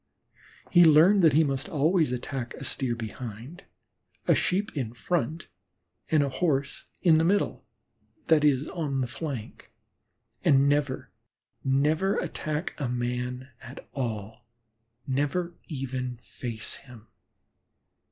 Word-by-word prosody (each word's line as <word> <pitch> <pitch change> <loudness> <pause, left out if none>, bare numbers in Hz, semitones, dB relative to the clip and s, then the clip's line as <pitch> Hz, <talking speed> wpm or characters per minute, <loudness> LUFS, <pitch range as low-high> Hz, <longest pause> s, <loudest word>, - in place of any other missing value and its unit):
He 175 -1 +8
learned 165 +6 +7
that 160 -5 +6
he 160 +3 +5
must 140 -1 -2
always 160 0 +2
attack 125 0 -4
a - - -8
Steer 130 -3 -1
behind, 115 - -7 0.6
a - - +6
Sheep 195 +2 0
in 120 -6 -3
front, 160 +4 -2 0.6
and 155 -2 +4
a 140 - 0
Horse 140 -1 -1 0.2
in 165 -3 +6
the - - +3
middle, 200 +4 +1 0.6
that 160 -5 +4
is, 145 -1 +3
on 145 -7 -2
the 125 - -1
flank, 125 -2 -6 0.7
and 140 0 +5
never, 145 -2 0 0.5
never 150 +8 +2
attack 155 +3 -3
a 135 -4 -1
man 125 +1 -3
at 125 - -11
all, 115 -2 -4 0.6
never 145 +6 -1
even 130 -4 -4
face 115 -1 -6
him. 120 -5 -14
140 Hz, 125 wpm, -27 LUFS, 125-160 Hz, 0.7 s, He